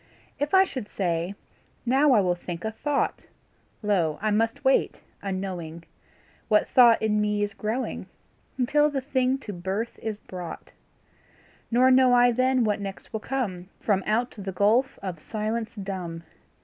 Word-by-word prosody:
If 290 +6 +1
I 380 - +8
should 255 - -6
say: 175 0 -2 0.5
Now 270 +3 +4
I 215 - +5
will 180 -2 +2
think 175 +1 -7
a 220 - -1
thought, 280 +6 -2 0.6
Lo! 175 -7 +1
I 215 +1 0
must 225 +6 0
wait, 265 - +2 0.2
unknowing, 185 -4 -5 0.6
What 210 - +3
thought 240 -3 +6
in 210 -1 +2
me 210 0 +1
is 205 -1 -2
growing, 220 +6 -3 0.5
Until 295 +4 +3
the 285 -2 -2
thing 260 -1 0
to 225 -6 -8
birth 190 +6 -4
is 220 -2 -3
brought; 180 -4 -8 1.0
Nor 250 +2 +4
know 255 -1 +6
I 245 0 +6
then 255 +1 +2
what 210 -2 0
next 195 -1 -7
will 220 - -1
come 200 -8 -3
From 200 -3 +1
out 235 +4 +1
the 195 -2 -5
gulf 220 +8 +2
of 180 -4 -4
silence 220 +4 -3
dumb. 185 -5 -5
215 Hz, 155 wpm, -26 LUFS, 190-255 Hz, 1.0 s, I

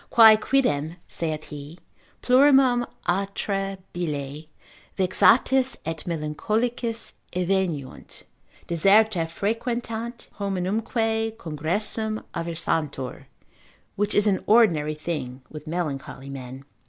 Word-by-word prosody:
Quae 225 -2 +9
quidem 175 - +1
(saith 155 -2 -3
he) 150 +2 -9 0.5
plurimum 260 -2 +5 0.2
atra 195 +1 -1 0.2
bile 150 -3 -4 0.5
vexatis 250 +7 +4
et 160 -1 -4
melancholicis 220 +9 -2 0.2
eveniunt, 180 -6 -2 0.4
deserta 195 +1 +4
frequentant, 230 +5 -3
hominumque 220 +3 -1
congressum 210 +7 -2
aversantur; 160 -5 -2 0.7
which 205 +1 -1
is 205 - +4
an 200 -3 +1
ordinary 165 -10 +4
thing 150 -5 -5
with 155 0 -9
melancholy 140 -4 -4
men. 130 0 -8
185 Hz, 85 wpm, -25 LUFS, 155-225 Hz, 0.7 s, Quae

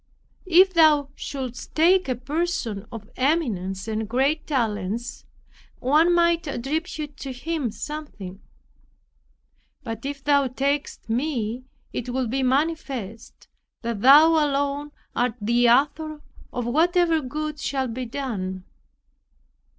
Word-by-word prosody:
If 370 +2 +6
Thou 305 -4 +5
shouldst 255 -4 -6
take 355 +1 +4
a 255 - +1
person 250 - -2
of 220 -2 -8
eminence 220 - 0
and 220 -1 -3
great 275 +6 +1
talents, 230 -3 -2 0.5
one 305 +7 +3
might 340 -1 +3
attribute 295 +3 -3
to 270 - -6
him 285 +1 -2
something; 210 -7 -7 1.4
but 225 -2 -6
if 280 0 -5
Thou 280 -2 +3
takest 280 +3 -2
me, 245 -1 -2 0.3
it 250 - -4
will 255 +1 -1
be 265 +4 -1
manifest 260 -5 -2 0.4
that 230 -3 -3
thou 290 +6 +8
alone 290 -2 +1 0.3
art 245 -2 +1
the 235 +3 +3
Author 300 +4 +2 0.3
of 245 -2 -3
whatever 330 +5 +3
good 300 +3 -4
shall 265 -3 -1
be 250 +1 -5
done." 195 -8 -4
270 Hz, 115 wpm, -24 LUFS, 235-305 Hz, 1.4 s, thou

